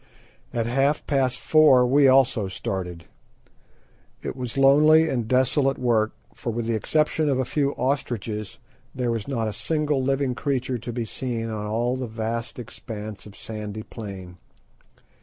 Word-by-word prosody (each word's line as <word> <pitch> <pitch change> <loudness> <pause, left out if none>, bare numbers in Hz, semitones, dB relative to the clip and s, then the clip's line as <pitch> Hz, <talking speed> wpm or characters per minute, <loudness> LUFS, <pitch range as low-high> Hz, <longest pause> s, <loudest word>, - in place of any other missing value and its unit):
At 115 -1 -1
half 135 +5 +1
past 130 -3 +1
four 150 -5 +5
we 140 +3 +5
also 130 -5 +4
started. 90 -3 -5 1.2
It - - -4
was 125 -1 -5
lonely 155 +4 +6
and 120 -7 -1
desolate 130 +2 +2
work, 115 -3 +1 0.2
for - - -5
with 115 0 -2
the 115 - 0
exception 150 +6 +1
of 135 - +2
a 130 - 0
few 140 +2 0
ostriches 120 -6 -2 0.4
there 125 -2 0
was 115 -3 -3
not 115 -5 -1
a 105 - -3
single 150 -1 0
living 135 0 0
creature 130 -2 -2
to 120 - -6
be 120 0 -3
seen 115 -1 -4
on 105 -1 -4
all 120 +4 0
the 130 -1 -4
vast 115 +1 -4
expanse 110 -3 -8
of 105 - -13
sandy 110 -1 -6
plain. 95 -6 -9
125 Hz, 155 wpm, -24 LUFS, 110-135 Hz, 1.2 s, lonely